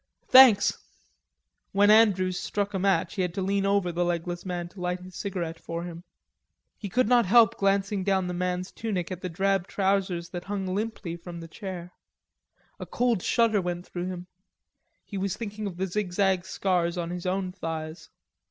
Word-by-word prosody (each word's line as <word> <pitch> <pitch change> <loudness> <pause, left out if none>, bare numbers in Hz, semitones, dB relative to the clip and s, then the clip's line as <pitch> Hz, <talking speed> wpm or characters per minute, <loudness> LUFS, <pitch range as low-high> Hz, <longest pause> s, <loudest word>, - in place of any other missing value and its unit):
"Thanks." 255 -6 +7 1.0
When 205 +1 +5
Andrews 190 -5 +4
struck 205 0 -2
a 190 - -1
match 190 -2 +1
he 190 - -2
had 180 -1 -2
to 195 - -2
lean 195 +1 +1
over 200 -3 +2
the 175 +1 0
legless 175 +1 -3
man 175 -1 -3
to 180 +1 -12
light 180 0 -2
his 185 -1 -12
cigarette 170 -5 -4
for 165 0 -5
him. 170 -1 -8 0.7
He 205 - -7
could 250 +4 +2
not 240 -3 +4
help 225 +1 +6
glancing 195 0 +1
down 190 -1 +1
the 180 - -3
man's 180 +1 -2
tunic 195 -6 -3
at 185 -1 -5
the 185 - -4
drab 195 +2 0
trousers 190 -3 0
that 175 -1 -6
hung 200 -1 -3
limply 190 -2 -3
from 170 0 -9
the 165 - -8
chair. 180 -1 -7 0.9
A - - -7
cold 240 -6 +1
shudder 220 -1 +2
went 175 0 -4
through 175 0 -5
him; 180 -1 -6 0.8
he 200 - -5
was 195 +1 -2
thinking 210 -2 -5
of 180 -3 -7
the 190 - 0
zigzag 190 -1 0
scars 180 -2 0
on 170 -1 -3
his 180 0 -4
own 185 0 -1
thighs. 160 -2 -6
185 Hz, 180 wpm, -27 LUFS, 175-200 Hz, 1.0 s, Thanks